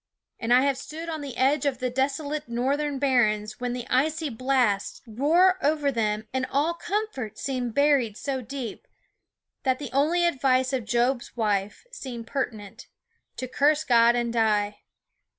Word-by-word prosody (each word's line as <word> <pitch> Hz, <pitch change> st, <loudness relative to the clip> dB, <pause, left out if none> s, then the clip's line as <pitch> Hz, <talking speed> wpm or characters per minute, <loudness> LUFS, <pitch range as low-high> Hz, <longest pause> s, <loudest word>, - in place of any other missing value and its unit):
And 230 Hz, -, -3 dB
I 250 Hz, +1 st, +7 dB
have 275 Hz, -1 st, +1 dB
stood 325 Hz, +4 st, -7 dB
on 315 Hz, -2 st, -4 dB
the 275 Hz, -4 st, -7 dB
edge 275 Hz, +4 st, +2 dB
of 270 Hz, -3 st, 0 dB
the 250 Hz, 0 st, -2 dB
desolate 285 Hz, +2 st, -2 dB
northern 275 Hz, +4 st, -1 dB
barrens 215 Hz, -6 st, +1 dB
when 245 Hz, -1 st, -2 dB
the 245 Hz, -1 st, -5 dB
icy 310 Hz, +4 st, +1 dB
blasts 245 Hz, -5 st, 0 dB
roared 315 Hz, +11 st, +3 dB
over 290 Hz, -1 st, +1 dB
them 215 Hz, -3 st, -1 dB
and 260 Hz, 0 st, -1 dB
all 295 Hz, +5 st, +1 dB
comfort 340 Hz, -, -4 dB
seemed 250 Hz, -4 st, -3 dB
buried 280 Hz, -7 st, +3 dB
so 270 Hz, -2 st, -3 dB
deep 255 Hz, -2 st, -7 dB, 0.7 s
that 260 Hz, -2 st, 0 dB
only 305 Hz, +6 st, +2 dB
the -, -, +3 dB
advice 260 Hz, -3 st, +1 dB
of 250 Hz, -4 st, -1 dB
Job's 240 Hz, +2 st, 0 dB
wife 210 Hz, -, -1 dB
seemed 250 Hz, -, -7 dB
pertinent: 220 Hz, -6 st, -5 dB, 0.5 s
to 255 Hz, -, -4 dB
"curse 295 Hz, +4 st, +2 dB
God 235 Hz, -4 st, +5 dB
and 240 Hz, -1 st, -1 dB
die." 210 Hz, -3 st, +1 dB
260 Hz, 155 wpm, -26 LUFS, 235-285 Hz, 0.7 s, I